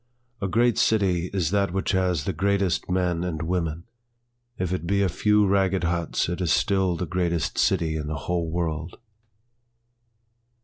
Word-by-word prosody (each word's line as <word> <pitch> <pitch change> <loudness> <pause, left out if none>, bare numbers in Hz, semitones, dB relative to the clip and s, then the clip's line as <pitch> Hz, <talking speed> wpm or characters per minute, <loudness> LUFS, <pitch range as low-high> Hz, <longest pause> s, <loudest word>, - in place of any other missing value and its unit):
A 95 - 0
great 120 +4 +2
city 90 -5 +2
is 90 -4 -1
that 100 -2 +1
which 95 +1 -1
has 90 -5 +1
the - - -2
greatest 100 -3 0
men 90 -2 0
and 80 -4 -3
women, 85 -1 -2 0.7
If 90 -1 -2
it 85 -2 -3
be 100 +1 +2
a 95 - +2
few 105 +3 +3
ragged 95 -2 +2
huts 85 -1 0
it 90 +2 -3
is 85 -4 +1
still 95 -4 +2
the 90 - -2
greatest 85 -1 -1
city 85 -4 +1
in 75 -1 -4
the 75 - -3
whole 85 -2 -1
world. 80 -1 -3
90 Hz, 165 wpm, -25 LUFS, 85-95 Hz, 0.7 s, few